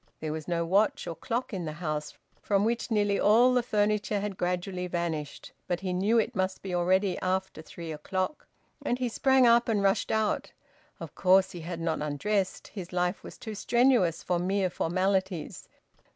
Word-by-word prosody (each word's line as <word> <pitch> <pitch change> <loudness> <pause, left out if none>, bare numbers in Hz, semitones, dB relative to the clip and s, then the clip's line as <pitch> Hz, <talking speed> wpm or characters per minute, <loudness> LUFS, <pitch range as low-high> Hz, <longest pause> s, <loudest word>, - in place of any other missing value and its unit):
There 155 -1 -3
was 155 -1 -6
no 170 -1 0
watch 200 +5 +2
or 170 - -4
clock 235 +5 -3
in 180 -3 -3
the 155 - -4
house, 155 -2 -4 0.2
from 200 0 +1
which 235 +2 -1
nearly 205 -3 +1
all 235 +5 +5
the 250 - +3
furniture 210 -2 0
had 200 -1 -3
gradually 180 +1 -2
vanished, 165 -4 -4 0.2
but 175 0 -1
he 185 -2 -2
knew 200 +6 +2
it 225 +2 +1
must 190 0 -1
be 190 -2 -4
already 185 +2 +2
after 185 -2 -2
three 165 0 -8
o'clock; 185 - -3 0.4
and 245 - 0
he 255 -1 -1
sprang 265 +2 +3
up 235 0 +5
and 210 -3 +1
rushed 195 +1 +2
out. 220 -1 0 0.5
Of - - -8
course 190 0 +4
he 175 - -8
had 170 +1 -5
not 165 -2 -1
undressed; 185 +7 -1
his 185 -4 -8
life 180 +1 0
was - - -10
too 220 - -7
strenuous 235 -5 +2
for 175 -1 0
mere 190 +1 0
formalities. 185 0 -1
190 Hz, 180 wpm, -28 LUFS, 175-210 Hz, 0.5 s, all